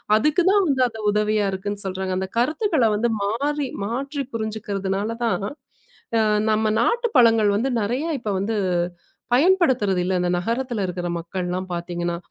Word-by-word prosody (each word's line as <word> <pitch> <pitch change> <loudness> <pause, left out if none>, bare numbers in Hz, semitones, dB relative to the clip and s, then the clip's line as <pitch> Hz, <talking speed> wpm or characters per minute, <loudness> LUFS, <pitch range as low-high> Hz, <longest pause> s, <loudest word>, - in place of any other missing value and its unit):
அதுக்கு 300 - +3
தான் 405 0 +4
வந்து 270 -3 +1
அது 225 -1 -9
உதவியா 210 0 +1
இருக்குன்னு 205 +2 -3
சொல்றாங்க. 190 0 -3
அந்தக் 190 +3 -4
கருத்துக்கள்ல 305 - +2
வந்து 235 +3 +1
மாறி 280 +7 -1 0.2
மாற்றிப் 270 +4 -3
புரிஞ்சுக்கிறதுனால 205 -2 -2 0.2
தான் 220 -3 0 1.1
நம்ம 215 +1 +1 0.2
நாட்டுப் 470 - 0
பழங்கள் 225 -3 +5
வந்து 235 +6 0
நெறைய 245 +9 -1
இப்ப 215 -3 -3
வந்து 215 +3 -1 0.8
பயன்படுத்துறது 260 - +3
இல்ல. 190 - 0
இந்த 180 - 0
நகரத்துல 230 +3 -2
இருக்கிற 180 0 -4
மக்கள் 175 +2 -4
எல்லாம் 185 +1 -3
பாத்தீங்கன்னா, 175 0 -3
220 Hz, 140 wpm, -23 LUFS, 190-265 Hz, 1.1 s, பழங்கள்